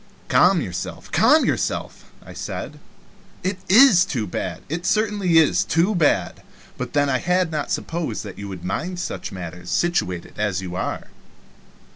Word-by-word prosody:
"Calm 180 -1 +5
yourself, 90 -6 -6
calm - - +5
yourself," - - -2 0.2
I - - -10
said. - - -6 0.6
"It 185 +1 -2
is 215 -3 +7
too 130 - -2
bad 90 - -5
it 165 +4 -3
is - - -4
certainly 200 -8 +3
too 170 +7 +2
bad, 145 - +1 0.3
but - - -6
then 145 -1 +3
I 130 -2 +1
had 180 -1 +1
not 150 -2 -3
supposed 160 -9 -3
that 100 -3 -9
you 100 - -6
would 95 -3 -8
much 95 - 0
mind 180 -1 -6
such - - -5
matters 90 -1 -8
situated 90 - -1
as 105 -3 0
you 90 -2 -6
are." - - -4
160 Hz, 160 wpm, -22 LUFS, -, 0.6 s, is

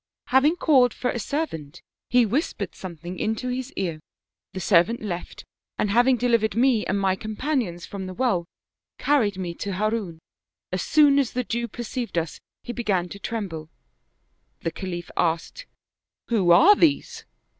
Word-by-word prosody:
" - - -67
Having 285 +5 +5
called 260 -9 +4
for 250 - -1
a 240 - -3
servant 175 - -4 0.3
he 245 -1 +5
whispered 275 - -2
something 175 0 -8
into 225 +4 -1
his 255 +2 -3
ear; 170 -5 -3 0.5
the 190 - -6
servant 185 +5 +3
left, 180 -4 -6 0.3
and 205 - 0
having 245 +3 +4
delivered 230 -4 +1
me 240 -2 +3
and 200 - 0
my 190 -1 +2
companions 215 - -2
from 195 -2 -6
the 185 - -6
well, 195 -9 0 0.5
carried 225 -10 +2
me 180 -2 -4
to 200 +3 -4
Harun. 210 -3 -1 0.5
As 185 0 -1
soon 290 - +5
as 270 -4 0
the 250 - -1
Jew 235 +1 -2
perceived 240 -2 -5
us 165 -2 -2 0.2
he 240 - -5
began 195 -7 -1
to 200 - -9
tremble; 190 -8 -5 0.9
the 165 - -2
Khalif 175 -2 -6
asked: 165 -1 -1 0.6
'Who 205 -7 +2
are 345 - +8
these?' 320 -7 +1
215 Hz, 155 wpm, -24 LUFS, 180-250 Hz, 0.9 s, are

